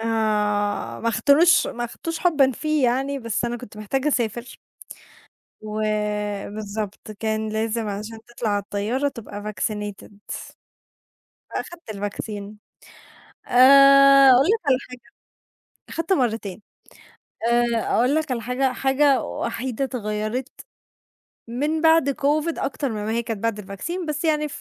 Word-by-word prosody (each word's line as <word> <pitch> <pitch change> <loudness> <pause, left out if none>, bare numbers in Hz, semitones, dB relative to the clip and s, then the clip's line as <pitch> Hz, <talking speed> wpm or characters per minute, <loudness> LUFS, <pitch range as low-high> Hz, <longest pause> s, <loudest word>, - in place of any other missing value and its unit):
آآ، - - -5 1.0
ما 230 - 0
اختاروش 285 +10 +4
ما 240 0 -4
أخدتوش 325 +7 -5
حبًا 295 -7 +3
فيه 305 +2 0
يعني، 270 +3 0
بس 230 -1 -2
أنا 240 0 -2
كنت 220 -3 -12
محتاجة 265 +7 -1
أسافر. 240 -2 -2 1.0
وبالضبط 210 -1 -3
كان 220 +1 -2
لازم 220 +1 -2
عشان 210 +2 -6
تطلَع 240 -2 -4
على 205 -1 +1
الطيارة 220 +8 -1
تبقى 210 -5 -7
vaccinated، 210 0 -4 1.2
فأخدت 340 -9 -8
الvaccine 205 0 -5 0.9
آآ 275 +1 +8
أقول 260 +5 +5
لك 445 +2 +3
على 260 - +4
حاجة، 250 -1 -11 0.9
أخدت 330 +3 -2
مرّتين. 225 - -1 0.9
آآ 235 -1 +2
أقول 250 +5 +3
لك 310 -2 -1
على 235 - -2
حاجة، 250 +2 0
حاجة 270 0 +2
وحيدة 255 +2 -3
اتغيّرت 220 0 -3 1.0
من 295 +7 -1
بَعد 320 -3 +4
COVID 300 +4 0
أكترمن 255 -6 -3
ما 220 - -2
هي 235 +1 0
كانت 225 -2 -5
بَعد 230 -2 0
الvaccine، 270 - -5
بس 300 +2 -2
يعني 300 -1 +1
240 Hz, 120 wpm, -23 LUFS, 215-275 Hz, 1.2 s, آآ